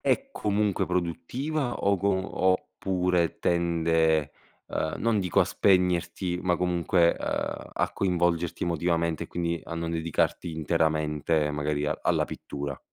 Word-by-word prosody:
è 275 0 0
comunque 105 - 0
produttiva 120 - -2
o 100 0 +1
co 100 - +1 0.4
oppure 90 -2 -1
tende, 80 -3 +2 0.4
ehm, 80 0 -2
non 115 -2 +1
dico 90 -3 +2
a - - +5
spegnerti, 90 -1 +1
ma 90 -2 +2
comunque, 90 -1 +2
uhm, - - -3
a - - 0
coinvolgerti 85 -2 0
emotivamente 85 -1 0
e - - -9
quindi 85 -1 -2
a 85 - -7
non 85 0 -3
dedicarti 85 +1 -1
interamente 80 -1 +1
magari 75 0 -1
alla - - +1
pittura? 70 -1 -6
85 Hz, 125 wpm, -27 LUFS, 80-90 Hz, 0.4 s, a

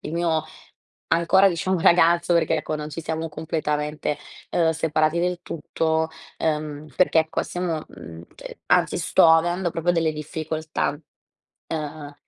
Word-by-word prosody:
il 155 - -7
mio 165 -2 0 0.7
ancora, 180 +4 +5
diciamo, 185 +1 0
ragazzo, 170 -1 +4
perché, 160 -1 +2
ecco, 155 0 -3
non 150 0 -6
ci 165 - -5
siamo 160 0 -3
completamente, 150 -1 -2 0.4
uhm, 165 -2 +3
separati 160 0 +1
del 180 0 0
tutto, 160 0 -1 0.3
uhm, 150 -1 -2
perché 180 -2 +3
ecco, 160 0 -1
stiamo, 175 -3 -3
mhmm, 80 0 -11
cioè, - - -10
anzi - - +3
sto - - +4
avendo 175 +2 +3
proprio 165 +2 0
delle 165 -2 +1
difficoltà, 155 +1 -3 0.8
uhm, 150 -2 -5
160 Hz, 135 wpm, -23 LUFS, 155-170 Hz, 0.8 s, ancora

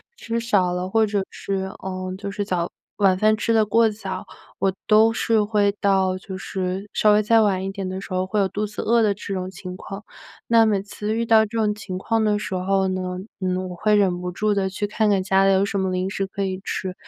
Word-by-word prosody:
吃 230 0 -3
少 200 -6 +2
了 180 +1 -3
或 220 +1 +3
者 205 -2 -1
是， 190 -1 -3
呃， 185 -1 -4
就 200 0 -5
是 205 0 -3
早 175 -3 -1 0.3
晚 195 -3 +3
饭 215 +2 +4
吃 230 +2 0
得 220 -1 +4
过 225 +2 +4
早， 215 +1 -6 0.3
我 190 -1 +1
都 220 +1 +6
是 225 -1 +2
会 205 -1 +2
到 190 -2 +2
就 190 0 -8
是 190 +1 -4
稍 210 -1 +4
微 210 0 +3
再 225 +1 +4
晚 190 -3 +1
一 195 - -3
点 195 -1 -5
的 185 +1 -4
时 195 - -7
候 185 0 0
会 210 +1 +1
有 195 - +2
肚 210 +2 -2
子 210 - -6
饿 235 +1 +3
的 210 -2 +3
这 200 0 -6
种 185 -1 -3
情 185 -1 -8
况。 195 +2 -8 0.4
那 230 -1 +5
每 205 -3 +1
次 210 +2 -4
遇 230 +1 0
到 220 -1 +5
这 225 +2 -6
种 210 -1 +2
情 200 -3 -6
况 225 +3 0
的 210 -1 +2
时 200 -2 -5
候 190 +1 +1
呢， 185 -1 -3 0.2
嗯， 185 0 -2
我 180 - -7
会 210 +3 +3
忍 190 -4 +2
不 180 0 -4
住 210 +3 +1
地 195 -1 0
去 205 +2 -3
看 210 +1 +1
看 195 -2 +2
家 190 0 +3
里 195 - +5
有 190 +1 +3
什 200 0 -2
么 190 -1 0
零 185 +1 -1
食 195 0 -2
可 200 +1 -4
以 190 -1 -2
吃。 185 -1 -3
195 Hz, 265 characters per minute, -23 LUFS, 185-215 Hz, 0.4 s, 都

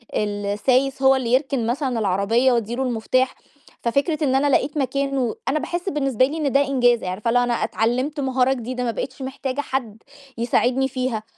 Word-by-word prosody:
السايس 210 +7 0
هو 265 0 +6
اللي 245 -2 -1
يركن 265 -3 +1
مثلًا 250 -1 -1
العربية 210 +6 +2
وادّي 235 -1 0
له 265 - -1
المفتاح، 255 +1 0 0.5
ففكرة 285 +6 0
إن 265 -2 +2
أنا 275 +2 +3
لقيت 285 +2 +1
مكان 275 0 -1
و 245 -4 0
أنا 305 - +1
باحس 345 +4 -3
بالنسبة 270 - +1
لي 300 +5 -4
إن 290 -3 0
ده 275 - +4
إنجاز، 245 -3 +3
عارفة 185 +5 -2
اللي 245 +2 +4
هو 245 - +2
أنا 245 - 0
اتعلمت 250 +6 -1
مهارة 265 -1 +2
جديدة 250 0 -4
ما 240 - 0
بقيتش 255 +5 -6
محتاجة 265 +1 -3
حد 240 -6 -4 0.3
يساعدني 250 +3 +1
فيها، 255 -4 -3
255 Hz, 185 wpm, -22 LUFS, 235-275 Hz, 0.5 s, هو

